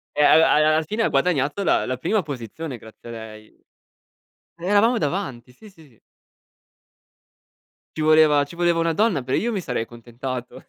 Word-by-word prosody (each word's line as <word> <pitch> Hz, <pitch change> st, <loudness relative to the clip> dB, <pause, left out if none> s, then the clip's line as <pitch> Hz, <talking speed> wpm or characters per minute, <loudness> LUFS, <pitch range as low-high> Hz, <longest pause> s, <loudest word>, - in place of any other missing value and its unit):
e 150 Hz, -, +3 dB
alla 160 Hz, +2 st, +5 dB
al 150 Hz, -, +4 dB
alla 155 Hz, +1 st, +2 dB
fine 215 Hz, +8 st, -2 dB
ha -, -, +1 dB
guadagnato 145 Hz, +3 st, 0 dB
la 175 Hz, -, +2 dB
la 130 Hz, 0 st, -3 dB
prima 205 Hz, -, 0 dB
posizione 140 Hz, +1 st, -7 dB
grazie 110 Hz, +1 st, -14 dB
a -, -, -7 dB
lei. 110 Hz, -1 st, -12 dB, 0.9 s
Eravamo 205 Hz, +7 st, +2 dB
davanti, 140 Hz, -, -4 dB
sì, 210 Hz, -, -16 dB
sì. 155 Hz, -, -21 dB, 2.0 s
Ci -, -, -3 dB
voleva 155 Hz, -2 st, +5 dB
ci 145 Hz, -, -13 dB
voleva 170 Hz, -1 st, +1 dB
una 165 Hz, 0 st, +1 dB
donna, 195 Hz, -, +1 dB
però 130 Hz, -, -1 dB
io 235 Hz, -, -1 dB
mi 200 Hz, -4 st, -3 dB
sarei 125 Hz, -8 st, -3 dB
accontentato. 120 Hz, +2 st, -8 dB
150 Hz, 165 wpm, -22 LUFS, 125-175 Hz, 2.0 s, alla